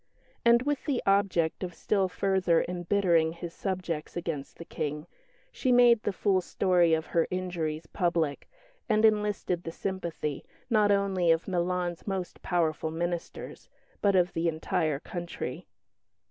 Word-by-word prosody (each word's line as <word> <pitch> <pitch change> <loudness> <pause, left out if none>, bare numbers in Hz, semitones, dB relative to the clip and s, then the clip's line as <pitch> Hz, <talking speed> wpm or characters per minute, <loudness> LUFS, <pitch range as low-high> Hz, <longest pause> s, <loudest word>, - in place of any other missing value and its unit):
And 235 +1 +5
with 290 0 -1
the 275 -5 -1
object 195 -5 +2
of 175 -2 -5
still 195 +1 +1
further 185 -3 +2
embittering 175 -2 +2
his 170 0 -7
subjects 180 -5 -4
against 165 -5 -4
the 170 - -9
King 150 -1 -4 0.5
she 255 - 0
made 240 -2 +6
the 205 - -1
full 190 0 +1
story 175 -3 +3
of 160 0 -3
her 165 -1 +1
injuries 170 -4 -3
public, 165 -5 -1 0.4
and 215 0 +4
enlisted 210 -4 +1
the 165 - -5
sympathy, 170 -5 -4 0.3
not 210 -2 +4
only 195 -3 +2
of 165 +1 +3
Milan's 180 -1 -1
most 190 -2 -4
powerful 160 -3 0
ministers, 170 +1 -5 0.3
but 200 -1 +3
of 180 -1 +3
the 165 +1 0
entire 155 -2 0
country. 175 +1 -6
175 Hz, 140 wpm, -28 LUFS, 165-195 Hz, 0.5 s, made